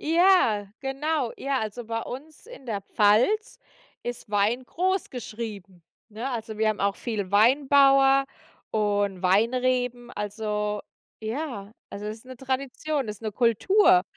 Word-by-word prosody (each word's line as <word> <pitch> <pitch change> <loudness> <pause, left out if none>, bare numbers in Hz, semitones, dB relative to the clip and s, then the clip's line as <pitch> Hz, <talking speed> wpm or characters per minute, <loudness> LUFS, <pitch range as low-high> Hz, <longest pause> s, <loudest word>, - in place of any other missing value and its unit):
Ja, 325 - +4
genau. 270 -1 -1
Ja, 275 -1 -1
also 220 +2 -5
bei 225 0 -3
uns 295 - -9
in 485 - -13
der 205 -3 -2
Pfalz 225 - +2 0.4
ist 240 -3 -6
Wein 215 +5 +1
groß 375 +9 -1
geschrieben, 215 -6 -7 0.3
ne? 230 +5 -5
Also, 225 -3 -5
wir 220 0 +2
haben 215 -1 -1
auch 200 0 +1
viel 205 -5 -4
Weinbauer 275 +4 +5 0.5
und 205 -3 0
Weinreben. 245 +4 +1
Also, 210 0 -3 0.4
ja 220 -3 -5 0.2
also, 205 +1 -6
ist 220 +3 -7
'ne 255 -1 -10
Tradition, 265 +1 -2
ist 210 +1 -7
'ne 215 - -3
Kultur. 235 - +4
235 Hz, 130 wpm, -26 LUFS, 210-270 Hz, 0.5 s, Weinbauer